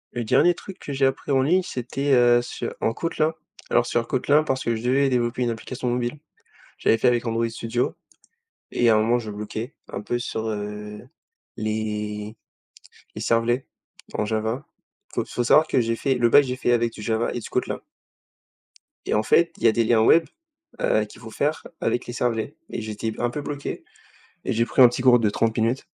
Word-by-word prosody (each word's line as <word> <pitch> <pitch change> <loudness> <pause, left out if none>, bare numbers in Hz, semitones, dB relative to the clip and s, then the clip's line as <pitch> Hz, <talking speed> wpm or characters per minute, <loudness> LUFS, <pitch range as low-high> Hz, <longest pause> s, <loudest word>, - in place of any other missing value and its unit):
Le 120 - -1
dernier 175 +10 +4
truc 190 +2 -10
que 140 - -7
j'ai 135 0 +3
appris 135 +1 -3
en 135 - +4
ligne, 180 +8 +3
c'était, 135 0 -3
heu, 120 -1 +6
sur 120 - -5
en 115 - +1
Kotlin 160 0 0 0.4
alors - - +4
sur 120 -1 0
Kotlin, 145 +4 +3
parce 130 -3 -1
que 115 - 0
je 110 - -6
devais 135 +3 +3
développer 120 -1 0
une 120 - +1
application 125 +2 -4
mobile. 120 +4 -2 0.6
J'avais 115 - +3
fait - - +3
avec 120 -1 +1
Android 115 0 0
Studio 115 +2 -2 0.8
et 120 - +3
à 110 - +6
un - - +4
moment, 115 +3 +2
je 110 -3 -7
bloquais 105 +5 -6
un - - -5
peu 120 +3 -2
sur, 115 -2 -4
heu, 105 +1 -6 0.5
les 105 -1 -3 0.8
les - - -6
Servlets 120 +3 +1 0.5
en 105 - 0
Java. 110 +5 -2 0.5
Faut - - -1
faut 120 - -2
savoir 155 +6 +5
que 130 - +2
j'ai 115 0 0
fait 135 +3 0
le 120 -2 +2
bac, 145 - +7
j'ai 125 -1 -3
fait 120 - +1
avec 120 -1 +2
du - - -9
Java 110 +2 0
et 120 - -3
du - - -9
Kotlin - - -2 1.3
et - - -1
en 105 - +2
fait, 170 +8 +3
il - - -11
y - - +7
a - - +6
des 115 +2 +1
liens 110 0 +3
web, 165 +9 +5 0.6
heu, - - +2
qu'il - - -15
faut - - -10
faire - - -1 0.2
avec 120 - -1
les 120 - -5
Servlets 120 -2 -2
et - - -4
j'étais 110 +1 -4
p - - -10
un 120 0 +1
peu 145 +3 -5
bloqué 145 -1 -5 0.6
et - - 0
j'ai 115 +1 +2
pris 130 - +2
un 125 - +11
petit 120 - -4
cours 125 -1 +6
de 110 -2 +2
30 115 +2 0
minutes 115 +4 0
120 Hz, 210 wpm, -24 LUFS, 110-130 Hz, 1.3 s, un